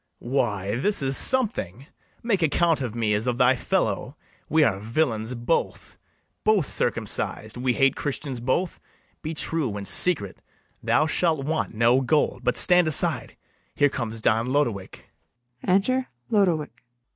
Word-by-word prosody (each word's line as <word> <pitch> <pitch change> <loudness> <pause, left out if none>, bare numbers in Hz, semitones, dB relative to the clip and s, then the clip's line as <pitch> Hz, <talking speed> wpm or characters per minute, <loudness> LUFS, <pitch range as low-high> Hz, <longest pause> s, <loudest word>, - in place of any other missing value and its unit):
Why, 105 -5 -1
this 200 +4 +1
is 135 0 +2
something: 140 - +1 0.4
make 215 -6 0
account 165 0 +1
of 120 -4 -4
me 110 -2 0
As 105 +4 0
of 120 -1 -1
thy 125 0 +4
fellow; - - -2 0.3
we 160 0 +3
are 100 -9 +1
villains 115 0 -2
both; 120 0 -2 0.5
Both 215 -7 +2
circumcised; 110 -4 -2
we 125 0 -1
hate 135 +1 +2
Christians 140 -3 -4
both: 130 +9 -2 0.4
Be 160 +1 -5
true 145 -9 -2
and 100 -1 -6
secret; 100 - +2 0.4
thou 155 - +2
shalt 160 -3 0
want 155 -6 -2
no 120 +4 +3
gold. 150 +3 0
But - - 0
stand 180 -2 +5
aside; 155 - +2 0.4
here 145 0 +3
comes 115 -4 -5
Don 115 +2 +1
Lodowick. 125 -8 -2 0.6
Enter 250 +8 +1 0.2
LODOWICK. 175 - +1
LODOWICK. - - -43
135 Hz, 145 wpm, -24 LUFS, 115-160 Hz, 0.6 s, stand